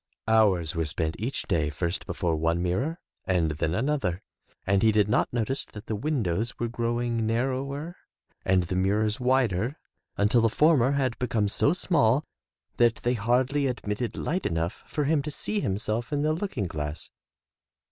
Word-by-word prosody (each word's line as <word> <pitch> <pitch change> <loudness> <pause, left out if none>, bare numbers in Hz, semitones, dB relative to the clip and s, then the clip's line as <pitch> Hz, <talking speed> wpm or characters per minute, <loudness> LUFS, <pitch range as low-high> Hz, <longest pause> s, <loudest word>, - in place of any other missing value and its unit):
Hours 100 -7 +3
were 80 -2 -1
spent 80 +1 -1
each 120 +6 -2
day 80 -6 0
first 85 +4 -3
before 85 -3 -1
one 80 +2 +1
mirror 110 - -1 0.3
and 85 -4 +2
then 80 +2 -1
another, 110 - -1 0.4
and 100 0 +2
he 110 - +5
did 105 -1 +3
not 115 - +1
notice 120 +3 -1
that 105 - -11
the 110 - -2
windows 115 - -1
were 120 - -1
grow 120 0 -1
ing 120 -2 -1
narrower 135 +7 -2 0.5
and 95 -1 +3
the 90 +2 -3
mirrors 105 +5 +1
wider 125 - +1 0.4
until 105 +4 +3
the 115 - +3
former 140 0 +4
had 130 -4 0
become 115 -4 +1
so 125 +7 +2
small 150 -7 +2 0.5
that 120 -1 +4
they 120 - +2
hardly 125 +5 +1
admitted 115 -2 -3
light 180 +4 -1
enough 85 +1 -2
for 150 - -1
him 150 +1 +2
to 150 - -5
see 210 +8 -2
himself 110 - -2
in 145 0 0
the 155 +1 +2
looking 160 - -2
glass. 75 -3 -5
115 Hz, 165 wpm, -27 LUFS, 95-135 Hz, 0.5 s, he